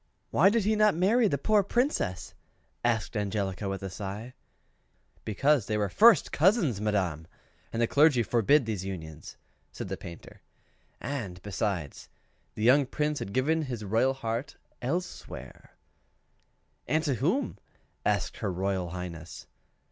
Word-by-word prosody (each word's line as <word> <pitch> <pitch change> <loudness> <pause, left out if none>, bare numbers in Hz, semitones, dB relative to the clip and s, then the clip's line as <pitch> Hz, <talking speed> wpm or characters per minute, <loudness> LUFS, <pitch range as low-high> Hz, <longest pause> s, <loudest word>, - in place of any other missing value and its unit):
"Why 185 +6 +5
did 225 0 +1
he 215 +2 +2
not 210 -3 +4
marry 215 +7 +3
the 140 - 0
poor 210 +8 +3
Princess?" 200 - -1 0.5
asked 120 -1 0
Angelica, 100 -2 -2
with 95 0 -4
a 95 - -3
sigh. 105 +6 -6 0.9
"Because 135 +3 +2
they 110 - 0
were 105 -2 0
first 225 - +5
cousins, 160 - +3
madam, 90 -7 -1 0.4
and 115 - -3
the 120 - +4
clergy 145 -1 +4
forbids 120 +6 +3
these 105 -4 -3
unions," 80 -5 -7 0.3
said - - -6
the - - -3
Painter. 85 -1 -11 0.6
"And, 120 -10 -5
besides, 95 -6 -3 0.5
the 105 - -3
young 130 +3 +5
Prince 150 +2 -1
had 100 - -5
given 155 +8 +1
his 120 -7 -5
royal 115 +6 +2
heart 115 +1 -4 0.2
elsewhere." 170 +9 -5 1.1
"And 155 +1 +1
to 145 -4 +1
whom?" 160 - -1 0.4
asked - - 0
her 100 - -2
Royal 95 -1 -1
Highness. 85 -3 -7
115 Hz, 140 wpm, -28 LUFS, 95-150 Hz, 1.1 s, Why